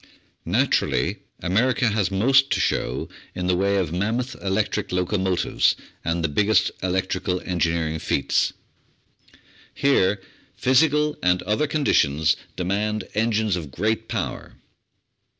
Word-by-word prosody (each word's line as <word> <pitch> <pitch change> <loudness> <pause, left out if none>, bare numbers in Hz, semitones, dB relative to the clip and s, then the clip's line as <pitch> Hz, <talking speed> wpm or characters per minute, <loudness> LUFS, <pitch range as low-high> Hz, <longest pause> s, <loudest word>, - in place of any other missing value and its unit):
Naturally, - - +1 0.2
America 115 +7 +2
has 105 -4 0
most 135 +8 +3
to - - 0
show - - -1 0.3
in 90 0 -3
the 90 0 +2
way 100 +2 +1
of 90 -5 -1
mam 100 +6 0
moth 125 +1 -3
electric 105 +2 -1
locomotives 90 0 +1 0.3
and 85 +1 -1
the - - +2
biggest 105 +9 +2
electrical 95 0 -1
engineering 85 -3 0
feats. 70 - +1 1.2
Here 105 -8 +2 0.4
physical 150 +3 +2
and 90 0 +2
other 110 +9 0
conditions 80 - +2 0.2
demand 105 +4 -2
engines 110 -2 +1
of 80 -5 -5
great 110 +9 -1
power. - - -4
100 Hz, 115 wpm, -23 LUFS, 90-110 Hz, 1.2 s, most